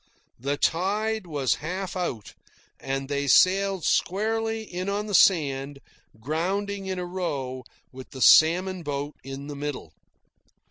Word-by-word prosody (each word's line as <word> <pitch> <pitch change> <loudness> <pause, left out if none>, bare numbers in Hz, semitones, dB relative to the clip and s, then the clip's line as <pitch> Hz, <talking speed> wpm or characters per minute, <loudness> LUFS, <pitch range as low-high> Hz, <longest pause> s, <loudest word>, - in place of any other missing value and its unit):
The 140 +4 -2
tide 205 +5 0
was 145 -5 0
half 185 +4 -4
out, 130 - -4 0.5
and 135 0 -3
they 140 0 -2
sailed 190 +5 +4
squarely 225 +3 0
in 185 -2 -5
on 205 +1 -2
the 210 - -6
sand, 145 -7 +3 0.4
grounding 190 - -2
in 190 -1 -3
a 180 - -3
row, 140 -8 -4 0.3
with 130 0 -11
the 130 -2 -9
salmon 180 +3 +5
boat 145 -1 -4
in 135 +1 -7
the 145 0 -7
middle. 140 - -5
170 Hz, 135 wpm, -26 LUFS, 140-195 Hz, 0.5 s, salmon